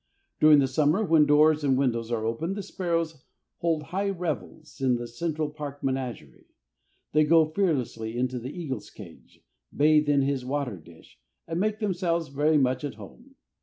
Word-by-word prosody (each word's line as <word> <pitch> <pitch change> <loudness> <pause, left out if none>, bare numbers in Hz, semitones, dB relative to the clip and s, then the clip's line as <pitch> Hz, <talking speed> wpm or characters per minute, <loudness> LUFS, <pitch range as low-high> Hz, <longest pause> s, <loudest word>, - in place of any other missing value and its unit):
During 155 -1 +7
the 135 -2 +3
summer, 150 +9 +2
when 160 -4 +4
doors 150 +1 +4
and 135 -2 +2
windows 115 -4 0
are 110 -2 -1
open, 160 +12 -2
the 205 - -5
sparrows 165 -6 -3 0.3
hold 165 -2 0
high 195 +7 -2
revels 160 -5 -5
in 130 -2 +3
the 120 0 -4
Central 155 +4 -3
Park 145 -2 -8
menagerie. 130 - -4 0.6
They 155 +1 +4
go 160 +1 +5
fearlessly 135 - -2
into 125 0 -1
the 125 +2 -6
eagle's 135 - -6
cage, 90 -6 -14 0.3
bathe 150 0 +3
in 140 -1 +3
his 135 -2 -1
water 130 -5 -3
dish, 80 -5 -18 0.3
and 165 +1 -3
make 210 +2 0
themselves 175 -6 -1
very 150 +3 +2
much 130 -1 +1
at 140 -6 -4
home. 240 - -14
150 Hz, 165 wpm, -26 LUFS, 130-165 Hz, 0.6 s, During